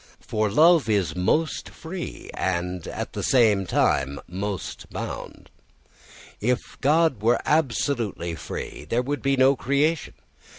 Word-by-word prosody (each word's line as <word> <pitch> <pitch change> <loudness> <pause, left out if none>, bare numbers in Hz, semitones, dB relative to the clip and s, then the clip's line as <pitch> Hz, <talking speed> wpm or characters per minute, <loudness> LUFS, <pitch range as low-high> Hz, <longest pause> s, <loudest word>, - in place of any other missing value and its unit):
For 110 -1 -1
love 155 - +5
is 95 -6 +1
most 150 - 0
free 170 +2 -7
and 90 -1 -2
at - - -5
the - - -3
same 105 -7 +3
time 70 +1 +1
most 95 +1 -5
bound. - - -7 0.9
If 125 +3 +1 0.2
God 150 -4 +3
were 115 +3 +3
absolutely 120 - 0
free - - -6
there 120 +2 +1
would 145 +3 -3
be 135 0 +1
no 130 +1 +5
creation. 145 +5 0
120 Hz, 125 wpm, -25 LUFS, 95-145 Hz, 0.9 s, love